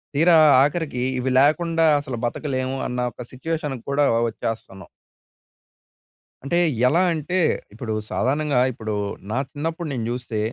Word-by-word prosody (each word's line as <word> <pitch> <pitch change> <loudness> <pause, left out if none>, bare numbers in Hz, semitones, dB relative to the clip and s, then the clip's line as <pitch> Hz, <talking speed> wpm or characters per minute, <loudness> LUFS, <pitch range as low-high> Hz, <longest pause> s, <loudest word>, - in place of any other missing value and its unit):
తీరా 165 +3 +5 0.3
ఆఖరికి 145 -4 -1 0.2
ఇవి 130 +1 -1
లేకుండా 165 +3 +3
అసలు 130 -4 -5
బతకలేము 130 +1 -2
అన్న 125 0 -4
ఒక 125 - -8
సిట్యుయేషన్ 150 +1 -3
కూడా 145 +1 +2 0.2
వచ్చేస్తన్నాం. 110 -4 -6 1.6
అంటే 170 +5 0 0.3
ఎలా 170 +7 +3
అంటే? 160 +4 -2 0.4
ఇప్పుడు 110 0 -4 0.2
సాధారణంగా 140 0 0
ఇప్పుడు 110 -3 -5 0.4
నా 125 - -1
చిన్నప్పుడు 165 +3 -4
నేను 115 -3 -3
చూస్తే 120 -3 -4
140 Hz, 120 wpm, -22 LUFS, 125-160 Hz, 1.6 s, తీరా